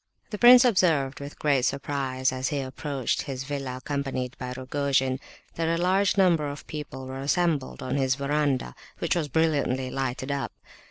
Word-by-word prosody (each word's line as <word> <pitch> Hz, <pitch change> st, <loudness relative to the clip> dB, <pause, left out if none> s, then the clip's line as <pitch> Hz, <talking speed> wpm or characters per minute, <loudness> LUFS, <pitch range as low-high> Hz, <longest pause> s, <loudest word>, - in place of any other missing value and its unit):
The 210 Hz, -, -4 dB
prince 250 Hz, +1 st, +9 dB
observed 165 Hz, -, +2 dB
with 140 Hz, +1 st, -8 dB
great 140 Hz, -3 st, +2 dB
surprise, 135 Hz, -1 st, -1 dB
as 130 Hz, 0 st, -2 dB
he 145 Hz, -, -1 dB
approached 135 Hz, 0 st, -2 dB
his 130 Hz, -2 st, -5 dB
villa, 135 Hz, -2 st, -4 dB
accompanied 130 Hz, -2 st, -3 dB
by 125 Hz, 0 st, -4 dB
Rogojin, 135 Hz, 0 st, 0 dB, 0.3 s
that 165 Hz, 0 st, -1 dB
a 165 Hz, +1 st, +1 dB
large 190 Hz, +3 st, +2 dB
number 170 Hz, -6 st, +3 dB
of 145 Hz, 0 st, -8 dB
people 140 Hz, -3 st, -7 dB
were 130 Hz, +1 st, -6 dB
assembled 145 Hz, -2 st, 0 dB
on 130 Hz, +2 st, -1 dB
his 135 Hz, -1 st, +2 dB
verandah, 140 Hz, -1 st, 0 dB, 0.2 s
which 170 Hz, -, 0 dB
was 165 Hz, -4 st, 0 dB
brilliantly 140 Hz, -4 st, +1 dB
lighted 130 Hz, 0 st, -3 dB
up. 140 Hz, -1 st, -3 dB
140 Hz, 165 wpm, -26 LUFS, 130-155 Hz, 0.3 s, prince